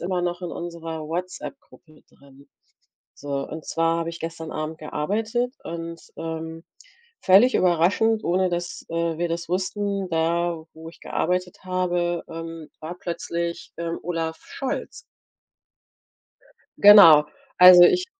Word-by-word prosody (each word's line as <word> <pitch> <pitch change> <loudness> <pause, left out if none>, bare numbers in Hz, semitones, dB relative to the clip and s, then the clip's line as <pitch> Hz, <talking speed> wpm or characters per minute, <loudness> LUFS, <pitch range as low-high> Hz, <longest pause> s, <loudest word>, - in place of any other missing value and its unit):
immer 180 0 -2
noch 175 +1 -3
in 175 - -4
unserer 165 -2 -6
Whatsapp-Gruppe 175 - -8
drin. 140 0 -20 0.7
So, 140 -1 -4
und 160 0 -8
zwar 165 0 0
habe 165 0 -3
ich 170 - -10
gestern 165 -1 -6
Abend 155 +1 -5
gearbeitet 220 - -2
und, 165 0 -6 0.2
ähm, 165 0 -6 0.6
völlig 200 +7 +5
überraschend, 185 +6 +2
ohne 185 +2 +1
dass, 175 0 -4
äh, 165 -1 -2
wir 175 0 -1
das 170 0 -4
wussten, 195 +1 -2
da, 165 0 -1
wo 160 0 -10
ich 165 - -15
gearbeitet 180 0 -2
habe, 175 -2 -1
ähm, 165 -1 -8
war 165 +3 -7
plötzlich, 170 -1 -4
ähm, 170 0 -4
Olaf 165 -1 -3
Scholz. 270 - -5 1.8
Genau, 170 -8 +9 0.3
also 180 -1 +10
ich 360 - +4
170 Hz, 125 wpm, -23 LUFS, 165-180 Hz, 1.8 s, also